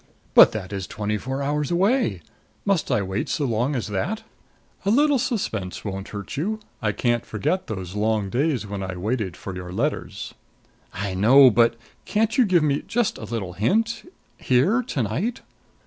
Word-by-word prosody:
"But - - +9
that 105 -3 -5
is 95 -2 -4
twenty 105 0 -2
four 135 +4 -3
hours 145 0 -1
away! 180 - +1 0.4
Must 195 -5 +1
I 105 - +2
wait 95 +2 -3
so 150 - 0
long 120 +4 0
as 120 - -2
that?" 175 - -2 0.6
"A 195 - 0
little 285 +4 +4
suspense 110 - -3
won't 95 -1 -4
hurt 100 +2 -6
you. 210 +9 -1 0.2
I 105 -2 +1
can't 120 +2 0
forget 155 - -2
those 95 -4 -5
long 105 -1 0
days 135 -2 0
when 100 -1 -5
I 95 -1 -4
waited 105 -1 -2
for 95 - -7
your 90 -1 -7
letters 130 +11 -3 0.3
" - - -35
"I 95 - -3
know! 125 +7 +7
But 115 +1 +4 0.3
can't 220 +1 +1
you 255 -3 +5
give 175 -4 +4
me 145 -2 +1
just 240 -2 0
a - - -6
little 100 -6 -4
hint 225 - 0 0.3
here 165 - +3
to 150 - -2
night?" 170 - -2
120 Hz, 180 wpm, -24 LUFS, -, 0.6 s, But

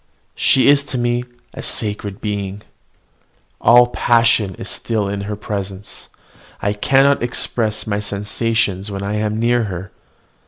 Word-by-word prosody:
She 130 - +3
is 140 0 +5
to 130 - -4
me 120 0 0 0.3
a - - -7
sacred 105 -1 -2
being. 100 -1 -4 1.0
All 120 +1 +7
passion 115 -5 +2
is - - -8
still 110 -3 -2
in 100 0 -3
her 105 - -2
presence: 100 -1 -6 0.5
I 100 - 0
cannot 135 +6 +3
express 115 -2 -1
my 105 -1 -1
sensations 105 -1 -1
when 100 -1 -5
I 100 +1 -2
am 105 0 -1
near 120 0 +2
her. 95 -1 -6
105 Hz, 140 wpm, -19 LUFS, 100-120 Hz, 1.0 s, All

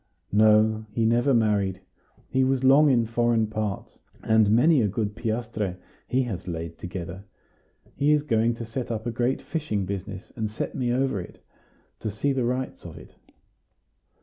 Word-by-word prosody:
"No, 110 +1 +4
he 115 +1 0
never 120 +5 +3
married; 105 -6 +2 0.5
he 130 0 +1
was 130 0 +1
long 140 +3 +6
in 120 -4 +3
foreign 115 0 +1
parts, 105 -2 -4 0.2
and 110 -2 +4
many 130 +7 +5
a 105 - +2
good 105 +1 -2
piastre 110 -4 -3 0.3
he 130 +1 +1
has 110 -9 -5
laid 85 -1 -5
together. 90 +1 -6 0.7
He 145 +2 +2
is 150 -1 +3
going 115 -4 +1
to 115 - -6
set 120 +2 -5
up 110 -1 -3
a 120 - -1
great 120 +3 -1
fishing 130 - -2
business, 95 +1 -6
and 110 -2 -2
set 110 - -4
me 125 -3 -1
over 130 -5 0
it, 90 - -13 0.5
to 110 - -3
see 125 +7 -1
the 130 -2 0
rights 125 +2 -3
of - - -9
it." - - -13
110 Hz, 170 wpm, -25 LUFS, 105-125 Hz, 0.7 s, long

